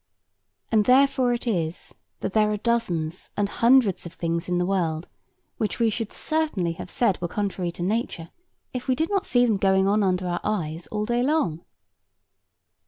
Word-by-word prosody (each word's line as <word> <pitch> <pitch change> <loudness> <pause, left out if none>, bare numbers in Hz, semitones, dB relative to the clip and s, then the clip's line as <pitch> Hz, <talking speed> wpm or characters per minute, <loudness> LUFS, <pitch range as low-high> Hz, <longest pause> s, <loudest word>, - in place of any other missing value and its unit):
And 215 -2 +4
therefore 260 -1 +4
it 240 +1 -2
is, 170 -8 -2 0.3
that - - -3
there 215 -1 +3
are 210 - -1
dozens 185 -8 -1
and 205 -1 +2
hundreds 235 -2 +3
of 170 - -11
things 170 +1 -2
in 180 - +1
the 180 - +1
world 170 -4 -1 0.5
which 215 - -2
we 230 -1 +3
should 225 0 -3
certainly 305 - -1
have 165 +2 -8
said 210 -4 +1
were 175 - -1
contrary 190 -2 -2
to 175 - -5
nature, 190 -5 -2 0.4
if 250 0 -5
we 260 - +2
did 320 +8 -1
not 395 -1 0
see 245 -1 +4
them 220 -4 +2
going 190 0 +3
on 210 +2 +3
under 185 -2 +1
our 175 0 -2
eyes 170 -6 -2
all 210 -1 -2
day 240 +2 +1
long. 245 - 0
205 Hz, 180 wpm, -25 LUFS, 175-235 Hz, 0.5 s, And